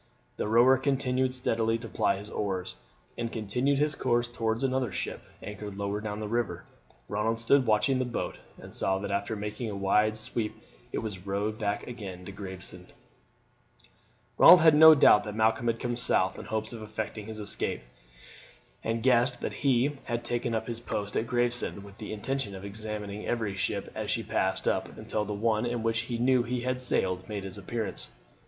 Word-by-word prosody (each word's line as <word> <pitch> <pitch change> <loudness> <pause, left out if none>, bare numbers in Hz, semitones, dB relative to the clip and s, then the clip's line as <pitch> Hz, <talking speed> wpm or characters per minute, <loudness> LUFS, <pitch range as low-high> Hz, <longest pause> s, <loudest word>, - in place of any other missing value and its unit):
The - - -2
rower 120 +4 +5
continued 130 -1 +1
steadily 115 -3 +1
to 115 0 -8
ply 100 -2 +1
his 105 +2 -9
oars, 95 -3 -3 0.4
and 115 -1 -2
continued 125 +6 0
his 150 +1 +2
course 120 -3 +1
towards 115 0 -2
another 130 -2 0
ship - - -4 0.2
anchored 105 -1 -7
lower 100 +1 -2
down 105 -1 -4
the 105 - -4
river. 115 0 -1 0.4
Ronald 110 +2 -1
stood 125 +3 +3
watching 120 +5 +3
the 130 - +1
boat, 120 - -4 0.2
and - - -12
saw 95 0 +1
that 100 +1 -4
after 100 +3 -1
making 105 +3 -4
a 105 - -4
wide 105 +2 +2
sweep 110 0 -2 0.4
it - - -3
was 100 -3 -6
rowed 105 +3 -2
back 100 -1 -1
again 100 -7 -8
to 100 - -7
Gravesend. 95 -2 -9 1.5
Ronald 180 -2 +10
had 160 -1 +7
no 160 +1 +10
doubt 120 -7 +6
that 105 -1 -5
Malcolm 110 +1 +2
had 115 0 +1
come 120 -1 -2
south 105 -6 +1
in - - -8
hopes 110 +1 -3
of 115 - -7
effecting 110 0 -5
his 110 -1 -7
escape, 105 -1 -1 1.0
and 115 0 -1
guessed 125 -1 +3
that - - -3
he 135 +1 +2
had 120 0 -2
taken 120 -1 -1
up 110 0 -1
his 115 -1 -5
post 105 -3 -4
at 115 - 0
Gravesend 120 -4 +1
with 100 0 -14
the 105 - -6
intention 110 -1 -3
of 95 +1 -8
examining 105 0 -4
every 110 -4 -1
ship 100 - -2
as - - -4
she - - 0
passed 95 0 -1
up - - -1
until 105 -1 -2
the 105 - -4
one 110 +2 +1
in 120 -1 -2
which 115 0 +1
he 120 - -1
knew 125 +1 +3
he 120 +1 -2
had 130 +1 -1
sailed 95 -6 +1
made 100 -2 -4
its 95 +1 -6
appearance. 110 -1 -2
110 Hz, 190 wpm, -29 LUFS, 105-120 Hz, 1.5 s, Ronald